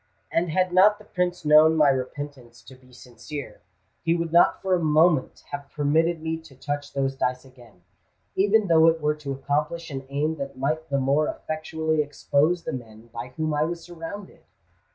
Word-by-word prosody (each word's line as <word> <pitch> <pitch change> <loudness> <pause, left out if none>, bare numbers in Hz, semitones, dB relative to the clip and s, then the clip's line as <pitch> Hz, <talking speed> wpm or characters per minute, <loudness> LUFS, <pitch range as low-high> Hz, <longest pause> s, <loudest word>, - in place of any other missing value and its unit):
And 170 +1 +1
had 185 +2 +1
not 205 +3 +6
the 210 - -17
Prince 180 -3 -2
known 155 +1 +6
my 150 -2 +5
repentance 130 -2 -5
to 130 - -14
be 130 0 -20
sincere, 125 +1 -9 0.4
he 165 0 +1
would 170 -1 -3
not 170 - +5
for 190 -1 -1
a 180 - +3
moment 155 -2 +2
have 175 -5 -6
permitted 160 +3 +1
me 160 0 -2
to 160 -4 -16
touch 145 +2 -4
those 135 -1 -1
dice 125 0 -2
again—even 120 - -3
though 165 -2 +5
it 165 0 +3
were 150 -1 +1
to 145 -2 -6
accomplish 150 +4 -2
an 135 -1 -6
aim 150 +3 -1
that 140 -1 -6
might 155 +4 -2
the 140 - +1
more 140 +3 +2
effectually 155 0 -2
expose 150 +3 0
the - - -4
men 115 -2 -9
by 115 +1 -5
whom 155 -1 -1
I 150 - 0
was 170 +2 -3
surrounded! 175 +3 -9
150 Hz, 180 wpm, -25 LUFS, 135-165 Hz, 0.4 s, not